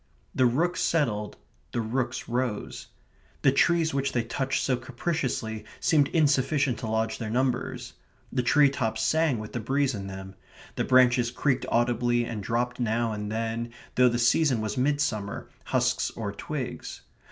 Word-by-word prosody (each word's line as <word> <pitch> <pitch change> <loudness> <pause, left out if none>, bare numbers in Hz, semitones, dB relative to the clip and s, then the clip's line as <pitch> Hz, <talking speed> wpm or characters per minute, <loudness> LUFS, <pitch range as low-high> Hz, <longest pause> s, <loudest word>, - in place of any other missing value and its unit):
The 130 - +4
rooks 165 +9 0
settled; 110 -10 0 0.4
the - - 0
rooks 120 +2 -2
rose. 120 -3 -3 0.6
The 135 - +6
trees 165 +3 +3
which 140 0 -1
they 120 - +1
touched 130 +3 -1
so 130 - +2
capriciously 120 -4 -3 0.2
seemed 150 -4 +3
insufficient 145 -4 +2
to 120 - -4
lodge 110 0 -1
their 110 - -4
numbers. 125 +1 -1 0.4
The 125 - +2
tree 140 +3 +4
tops 110 -5 -1
sang 155 +2 +2
with 110 -1 -7
the 120 - -2
breeze 135 +4 +1
in 100 -3 -5
them; 95 0 -8 0.4
the - - -1
branches 125 -2 +4
creaked 130 +2 0
audibly 120 0 +2
and 115 -3 -4
dropped 120 +4 -1
now 115 -1 0
and 105 -1 -4
then, 115 +1 -3 0.2
though 125 0 +5
the 120 - -1
season 125 +2 +3
was 110 +2 -2
midsummer, 130 -7 -1 0.2
husks - - +1
or 105 -3 -5
twigs. 130 +5 -5
120 Hz, 155 wpm, -27 LUFS, 115-135 Hz, 0.6 s, The